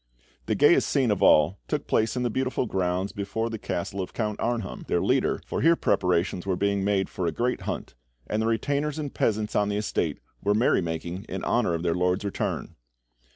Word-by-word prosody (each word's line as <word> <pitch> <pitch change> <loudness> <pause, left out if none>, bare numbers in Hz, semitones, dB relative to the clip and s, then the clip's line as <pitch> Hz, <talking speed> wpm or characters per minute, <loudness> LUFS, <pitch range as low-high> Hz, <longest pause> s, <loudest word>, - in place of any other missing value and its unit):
The - - +1
gayest 145 +4 +5
scene 130 -6 +2
of 105 - 0
all 75 +6 +5
took - - -2
place 110 +2 +1
in 125 - -1
the 120 - 0
beautiful 130 +2 -1
grounds 95 -2 -1
before 105 +3 -3
the 110 - -4
castle 95 +2 -3
of 90 - -6
Count 105 -2 -2
Arnheim, 115 -5 -2
their - - +1
leader, - - +2
for - - -3
here 165 +3 +5
preparations 90 - +1
were 95 -2 0
being 100 +1 0
made 100 -1 +1
for 90 - -3
a - - +1
great 125 +1 -1
hunt, - - -4 0.3
and 105 +1 -1
the 110 - +1
retainers 140 +6 0
and 145 -3 -4
peasants 105 -1 0
on 105 0 +2
the 105 - -1
estate 105 - -1 0.3
were 105 +1 +2
merry 115 -2 +3
making 85 +3 -4
in 95 -2 -5
honour 115 -8 +1
of 85 - -4
their 85 -1 +1
lord's 90 +3 0
return. 100 - -3
105 Hz, 205 wpm, -26 LUFS, 90-115 Hz, 0.3 s, gayest